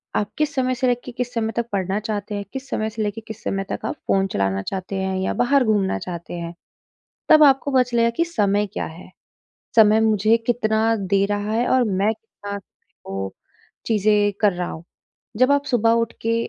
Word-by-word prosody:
आप 205 0 -1
किस 305 -1 0
समय 255 -1 +1
से 255 +1 0
लेके 245 0 -1
किस 245 0 -4
समय 225 -2 -1
तक 235 - 0
पढ़ना 190 +1 0
चाहते 210 -1 -4
हैं? 200 0 -4
किस 270 0 -6
समय 215 0 -1
से 220 0 -5
लेके 210 +2 -3
किस 220 - -9
समय 195 0 -1
तक - - -2
आप - - -2
फ़ोन 195 0 +2
चलाना 95 0 0
चाहते 190 - -5
हैं 190 0 -1
या - - -1
बाहर 250 +3 +3
घूमना 205 -3 +1
चाहते 170 -1 -7
हैं? 170 0 -5 0.8
तब 310 -1 +7
आपको 275 0 +4
पता 260 -1 +4
चलेगा 235 -2 +1
कि 335 - +2
समय 210 - +1
क्या - - -3
है? 170 +3 -11 0.7
समय 220 -1 +6
मुझे 220 0 +3
कितना 225 -1 +2
दे 195 0 +1
रहा 205 +1 -2
है? 235 +2 +1
और 255 -1 +3
मैं 205 +1 +1
कितना 205 -2 -9 0.5
वो 95 0 -4 0.5
चीज़ें 210 -1 +3
कर 210 -2 +4
रहा 180 0 -3
हूँ? 160 - -8 0.5
जब 255 +4 +4
आप 285 0 +2
सुबह 230 -3 +2
उठ 230 0 +1
के 230 0 +1
215 Hz, 200 wpm, -22 LUFS, 195-240 Hz, 0.8 s, तब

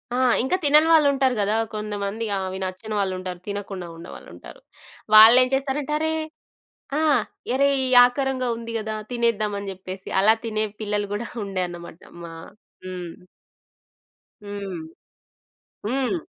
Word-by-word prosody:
ఆ! - - 0 0.3
ఇంకా 265 +8 +1
తినని 300 +2 +5
వాళ్ళు 305 -3 +6
ఉంటారు 265 -2 +1
గదా! 205 +2 +1 0.2
కొందమంది 210 +1 -4
ఆ! - - -1
అవి 185 0 -5
నచ్చని 200 +4 -5
వాళ్ళుంటారు. 185 -2 -3
తినకుండా 200 -3 -5
ఉన్నవాళ్ళుంటారు. 335 - -12 0.5
వాళ్ళెం 240 +4 +9
చేస్తారంటే, 275 +2 -1
అరే 315 0 0 0.9
ఆ! - - +1 0.5
అరే 280 +2 +3 0.2
ఈ - - 0 0.2
ఆకారంగా 260 0 -2
ఉంది 230 0 -7
గదా! 215 0 -4 0.2
తినేద్దామని 215 -4 -1
జెప్పేసి 185 0 -9
అలా 215 +3 +5
తినే 215 -1 -1 0.2
పిల్లలు 205 -1 -2
గుడా 215 +3 -3 0.2
ఉండే 195 -2 -3
అన్నమాట 170 0 -10 0.2
మ - - -8 0.6
హ్మ్. 180 -2 -6 1.3
హ్మ్. 200 -3 -6 1.1
హ్మ్. 265 - 0
215 Hz, 125 wpm, -23 LUFS, 195-255 Hz, 1.3 s, వాళ్ళెం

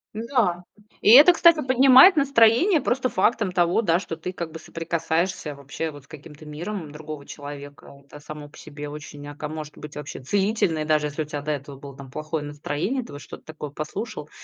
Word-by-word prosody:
Да. 220 -6 0 0.4
И - - +3
это, 295 +8 +9
кстати, 335 -1 +5
поднимает 260 +7 +7
настроение 275 - +4
просто 255 0 0
фактом 215 -4 +1
того, 175 +4 +2
да, 170 -4 +2
что 175 -3 -6
ты 170 +3 -6
как 170 -3 -6
бы 160 - -9
соприкасаешься 165 -1 -2
вообще 145 +3 -5
вот 145 -2 -13
с - - -30
каким-то 155 0 -13
миром 160 +1 -6
другого 150 -1 -8
человека. 145 -1 -10
Это 145 +1 -13
само 150 0 -9
по 145 - -18
себе 150 -1 -9
очень, 145 -1 -9
ака 145 +1 -7
может 155 -1 -8
быть, 150 -1 -10
вообще 145 -2 -7
целительное, 190 - 0
даже 150 -1 +1
если 150 +2 -4
у - - -10
тебя 145 -1 -5
до 150 - -3
этого 140 -1 -6
было 140 0 -11
там 135 -2 -11
плохое 155 0 -4
настроение, 150 - -3
ты - - -13
вот 145 0 -9
что-то - - -11
такое 150 -2 -8
послушал 155 +3 -6
155 Hz, 195 wpm, -24 LUFS, 145-210 Hz, 0.4 s, это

